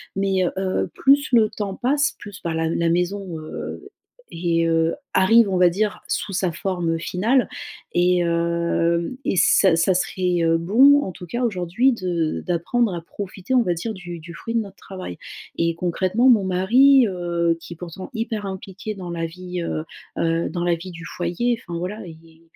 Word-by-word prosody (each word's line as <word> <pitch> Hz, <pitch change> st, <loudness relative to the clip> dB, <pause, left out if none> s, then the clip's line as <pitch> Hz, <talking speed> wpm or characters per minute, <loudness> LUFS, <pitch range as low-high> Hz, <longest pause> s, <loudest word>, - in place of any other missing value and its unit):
mais, 195 Hz, -1 st, +1 dB
heu, -, -, 0 dB
heu, 190 Hz, 0 st, -1 dB
plus 285 Hz, +2 st, +4 dB
le 220 Hz, -3 st, +5 dB
temps 200 Hz, -2 st, -3 dB
passe 280 Hz, +5 st, +1 dB
plus, 205 Hz, -1 st, -10 dB
bah, 170 Hz, -1 st, -2 dB
la 160 Hz, 0 st, 0 dB
la 165 Hz, +1 st, 0 dB
maison, 180 Hz, 0 st, -1 dB
heu, 155 Hz, -, -7 dB, 0.4 s
et 165 Hz, 0 st, 0 dB
heu, 165 Hz, 0 st, +2 dB, 0.2 s
arrive, 225 Hz, +4 st, +5 dB
on 185 Hz, -, 0 dB
va 180 Hz, -1 st, +6 dB
dire, 210 Hz, +4 st, -1 dB
sous 195 Hz, -, -2 dB
sa 180 Hz, -1 st, 0 dB
forme 170 Hz, -1 st, -2 dB
finale 220 Hz, +8 st, +1 dB, 0.5 s
et 175 Hz, 0 st, +3 dB
heu, 170 Hz, +3 st, 0 dB
et -, -, 0 dB
ça 180 Hz, +1 st, +5 dB
ça 185 Hz, +3 st, +3 dB
serait 180 Hz, -1 st, 0 dB, 0.2 s
bon 260 Hz, +12 st, +5 dB
en 190 Hz, -, -4 dB
tout 180 Hz, 0 st, -11 dB
cas 240 Hz, +8 st, -2 dB
aujourd'hui 215 Hz, +5 st, +1 dB
de 175 Hz, -6 st, -2 dB
d'apprendre 185 Hz, +5 st, 0 dB
à 170 Hz, -, -4 dB
profiter 190 Hz, +5 st, -6 dB
on 250 Hz, -, +6 dB
va 180 Hz, -, 0 dB
dire 215 Hz, +7 st, -4 dB
du 175 Hz, -3 st, -8 dB
du 170 Hz, +2 st, -10 dB
fruit 230 Hz, +6 st, -6 dB
de 230 Hz, -, +4 dB
notre 200 Hz, -3 st, -6 dB
travail 185 Hz, -, -8 dB, 0.4 s
et 170 Hz, 0 st, +1 dB
concrètement 185 Hz, +8 st, +1 dB
mon 220 Hz, -6 st, +5 dB
mari, 245 Hz, +9 st, +5 dB
heu, 170 Hz, -3 st, 0 dB
qui 170 Hz, -, -9 dB
est 165 Hz, -, -16 dB
pourtant 180 Hz, +4 st, -8 dB
hyper 225 Hz, -2 st, -3 dB
impliqué 195 Hz, +2 st, -6 dB
dans 180 Hz, -3 st, -7 dB
la 165 Hz, -1 st, -2 dB
vie, 180 Hz, +1 st, -6 dB
heu, 155 Hz, -1 st, -3 dB, 0.3 s
heu, 165 Hz, 0 st, 0 dB
dans 175 Hz, -1 st, -3 dB
la 175 Hz, -, +2 dB
vie 180 Hz, +3 st, -9 dB
du 165 Hz, -1 st, -10 dB
foyer 180 Hz, +10 st, -1 dB
enfin 170 Hz, -1 st, -5 dB
voilà 190 Hz, +5 st, -5 dB
i 170 Hz, -, -8 dB
i 165 Hz, 0 st, -20 dB
180 Hz, 190 wpm, -22 LUFS, 170-210 Hz, 0.5 s, va